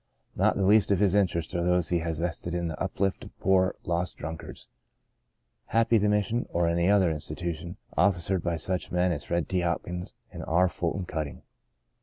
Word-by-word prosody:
Not -, -, +3 dB
the 95 Hz, -, +1 dB
least 105 Hz, +2 st, +5 dB
of 100 Hz, -, +3 dB
his 100 Hz, -2 st, +3 dB
interests 90 Hz, -5 st, +1 dB
are 85 Hz, -1 st, 0 dB
those 90 Hz, -2 st, +2 dB
he 85 Hz, -, +2 dB
has 80 Hz, -1 st, -3 dB
vested 85 Hz, +1 st, -2 dB
in 85 Hz, -1 st, -1 dB
the 80 Hz, -, -6 dB
uplift 95 Hz, 0 st, -1 dB
of -, -, -13 dB
poor, 95 Hz, -1 st, +3 dB
lost 85 Hz, +1 st, -2 dB
drunkards. 80 Hz, +1 st, -7 dB, 1.0 s
Happy 115 Hz, 0 st, +3 dB
the 105 Hz, +1 st, +2 dB
Mission 105 Hz, +3 st, 0 dB
(or 85 Hz, 0 st, +1 dB
any 85 Hz, +2 st, +2 dB
other 95 Hz, -4 st, +4 dB
institution) 80 Hz, +3 st, -5 dB, 0.2 s
officered 95 Hz, -1 st, +2 dB
by 85 Hz, 0 st, -1 dB
such 90 Hz, +3 st, -2 dB
men 90 Hz, +1 st, +2 dB
as 75 Hz, -4 st, -2 dB
Ferd. 85 Hz, -1 st, -1 dB
T. 95 Hz, -, 0 dB
Hopkins 90 Hz, +1 st, -3 dB, 0.2 s
and -, -, -7 dB
R. 90 Hz, +3 st, +4 dB
Fulton 90 Hz, +2 st, -2 dB
Cutting. 80 Hz, -5 st, -5 dB
90 Hz, 185 wpm, -28 LUFS, 85-95 Hz, 1.0 s, least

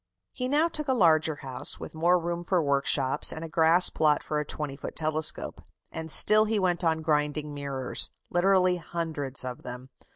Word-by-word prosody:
He 250 Hz, -, -4 dB
now 295 Hz, +5 st, +2 dB
took 305 Hz, -3 st, -3 dB
a 260 Hz, -, +1 dB
larger 160 Hz, -6 st, +3 dB
house, 135 Hz, -3 st, -2 dB
with -, -, -9 dB
more 170 Hz, +3 st, +2 dB
room 170 Hz, 0 st, -4 dB
for 180 Hz, +1 st, 0 dB
workshops, 140 Hz, -3 st, +2 dB
and 160 Hz, -, -7 dB
a -, -, -6 dB
grass 165 Hz, +3 st, +3 dB
plot 150 Hz, -1 st, +1 dB
for 150 Hz, -, -2 dB
a -, -, -2 dB
20 145 Hz, -1 st, -5 dB
foot -, -, -8 dB
telescope, 155 Hz, 0 st, -1 dB, 0.3 s
and 160 Hz, 0 st, -6 dB
still 215 Hz, +7 st, +5 dB
he 220 Hz, 0 st, -1 dB
went 180 Hz, -3 st, 0 dB
on 160 Hz, -1 st, 0 dB
grinding 150 Hz, -1 st, -1 dB
mirrors 140 Hz, -3 st, -1 dB, 0.2 s
literally 185 Hz, 0 st, +2 dB
hundreds 155 Hz, -6 st, -3 dB
of 125 Hz, -1 st, -6 dB
them. 125 Hz, +2 st, -10 dB
160 Hz, 185 wpm, -27 LUFS, 150-180 Hz, 0.3 s, still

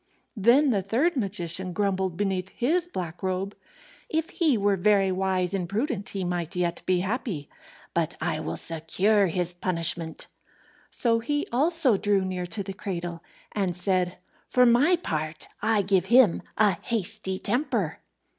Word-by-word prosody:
Then 245 Hz, +7 st, +4 dB
the 200 Hz, -4 st, +1 dB
third 250 Hz, -, +1 dB
magician 185 Hz, -, -1 dB
grumbled 190 Hz, -3 st, -1 dB
beneath 190 Hz, -2 st, -1 dB
his 330 Hz, -, 0 dB
black 175 Hz, -, -6 dB
robe, 190 Hz, +1 st, -2 dB, 0.5 s
"If 320 Hz, +3 st, -1 dB
he 310 Hz, -8 st, +2 dB
were 200 Hz, -1 st, +2 dB
very 195 Hz, 0 st, +3 dB
wise 185 Hz, -1 st, 0 dB
and 180 Hz, -3 st, -2 dB
prudent 215 Hz, -1 st, -2 dB
he 195 Hz, -2 st, -4 dB
might 175 Hz, 0 st, -3 dB
yet 175 Hz, -1 st, -1 dB
be 180 Hz, -1 st, +2 dB
happy. 195 Hz, -, -3 dB, 0.4 s
But 170 Hz, -1 st, -1 dB
I 160 Hz, -1 st, -1 dB
will 155 Hz, -, -4 dB
secure 185 Hz, +6 st, +2 dB
his 180 Hz, +1 st, -1 dB
punishment." 170 Hz, -2 st, 0 dB, 0.6 s
So 230 Hz, -2 st, +3 dB
he 290 Hz, +6 st, -1 dB
also 280 Hz, -, +4 dB
drew 200 Hz, -1 st, +1 dB
near 180 Hz, -1 st, -3 dB
to 200 Hz, +4 st, -2 dB
the 195 Hz, -, -6 dB
cradle, 175 Hz, -4 st, -5 dB, 0.3 s
and 190 Hz, -4 st, -1 dB
said, 180 Hz, -1 st, 0 dB, 0.3 s
"For 250 Hz, 0 st, +4 dB
my 255 Hz, +9 st, +5 dB
part, 155 Hz, -, -4 dB
I 215 Hz, -1 st, +2 dB
give 190 Hz, -2 st, +2 dB
him 235 Hz, -3 st, +5 dB, 0.2 s
a 205 Hz, -4 st, +3 dB
hasty 190 Hz, -3 st, -1 dB
temper." 255 Hz, +9 st, -1 dB
195 Hz, 150 wpm, -26 LUFS, 180-230 Hz, 0.6 s, my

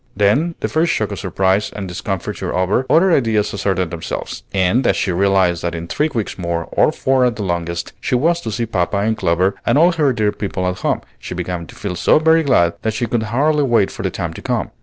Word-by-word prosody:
Then, 135 Hz, -, +2 dB
the -, -, 0 dB
first 165 Hz, +2 st, +1 dB
shock 110 Hz, -1 st, -1 dB
of 100 Hz, -, -5 dB
surprise 95 Hz, +2 st, +1 dB
and 100 Hz, -2 st, -5 dB
discomfiture 90 Hz, -, -4 dB
over, 95 Hz, +8 st, +1 dB
other 175 Hz, +6 st, +4 dB
ideas 115 Hz, -8 st, +1 dB
asserted 95 Hz, -3 st, -1 dB
themselves; 85 Hz, -2 st, -5 dB
and 100 Hz, +7 st, +2 dB
as -, -, +3 dB
she 95 Hz, -, 0 dB
realized 95 Hz, -2 st, +2 dB
that 85 Hz, 0 st, -2 dB
in 85 Hz, 0 st, -5 dB
three 150 Hz, -, 0 dB
weeks 110 Hz, -6 st, -3 dB
more, 85 Hz, -1 st, -2 dB
or -, -, +3 dB
four 130 Hz, -1 st, +1 dB
at 125 Hz, -2 st, +2 dB
the 110 Hz, -, -4 dB
longest, 85 Hz, -2 st, -3 dB
she -, -, 0 dB
was 170 Hz, +7 st, +2 dB
to 110 Hz, -, -4 dB
see 115 Hz, +2 st, -1 dB
papa 100 Hz, -3 st, -1 dB
and 110 Hz, +3 st, +1 dB
Clover 95 Hz, -2 st, +1 dB
and -, -, +2 dB
all 170 Hz, +4 st, +5 dB
her 155 Hz, -5 st, +2 dB
dear 110 Hz, -4 st, +1 dB
people 95 Hz, -3 st, -3 dB
at 90 Hz, 0 st, -3 dB
home, -, -, 0 dB, 0.2 s
she -, -, -7 dB
began 90 Hz, -1 st, -4 dB
to -, -, -13 dB
feel 95 Hz, -3 st, -4 dB
so 85 Hz, -, +4 dB
very 160 Hz, +1 st, +4 dB
glad 85 Hz, -, +3 dB
that 110 Hz, -1 st, -2 dB
she 120 Hz, -, -1 dB
could 115 Hz, 0 st, -1 dB
hardly 150 Hz, +6 st, +2 dB
wait 120 Hz, -8 st, +2 dB
for -, -, -7 dB
the -, -, -1 dB
time -, -, -4 dB
to -, -, -9 dB
come. -, -, -2 dB
105 Hz, 235 wpm, -18 LUFS, 90-130 Hz, 0.2 s, all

